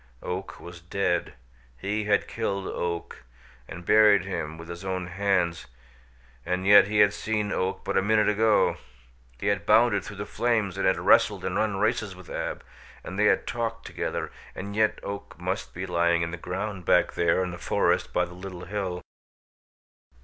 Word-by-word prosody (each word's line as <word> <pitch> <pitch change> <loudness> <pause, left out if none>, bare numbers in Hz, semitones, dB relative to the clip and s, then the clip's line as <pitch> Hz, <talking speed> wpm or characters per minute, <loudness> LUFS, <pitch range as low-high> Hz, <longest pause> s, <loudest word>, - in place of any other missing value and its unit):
Oak 95 +2 -5
was 85 -1 -11
dead; 90 0 -1 0.4
he 105 - -2
had 105 -1 +2
killed 100 -4 -3
Oak, 85 -1 -4 0.4
and 90 -2 -9
buried 105 -2 +6
him 80 -5 -4
with 85 0 -10
his 85 +2 -8
own 95 -1 -2
hands, 90 -2 0 0.8
and 90 +1 -2
yet 100 -1 +8
he 105 0 +3
had 105 0 +5
seen 105 -2 -2
Oak 95 +1 -2
but - - -2
a 95 - +4
minute 105 +2 +3
ago! 105 +1 +3 0.6
He - - -6
had 100 -1 0
bounded 105 -6 +4
through 105 - -8
the 100 +1 -5
flames 110 -6 0
and 95 -1 0
had 95 - +3
wrestled - - +3
and 90 - -2
run 105 -1 0
races 110 -2 0
with 90 -1 -13
Ab, - - -4 0.4
and 95 +2 -6
they 105 - +4
had - - +3
talked 115 -1 -3
together, 80 -2 -4 0.2
and 100 +2 -6
yet 110 0 +2
Oak 100 0 -7
must 95 +3 -3
be 90 +2 -5
lying 85 -1 +2
in 85 - -3
the - - -3
ground 95 +2 -4
back - - +3
there 85 +2 +2
in 90 - -3
the 85 - -8
forest - - +1
by - - +1
the 90 - -12
little 90 -1 -8
hill. 95 -2 -3
95 Hz, 180 wpm, -26 LUFS, 90-105 Hz, 0.8 s, yet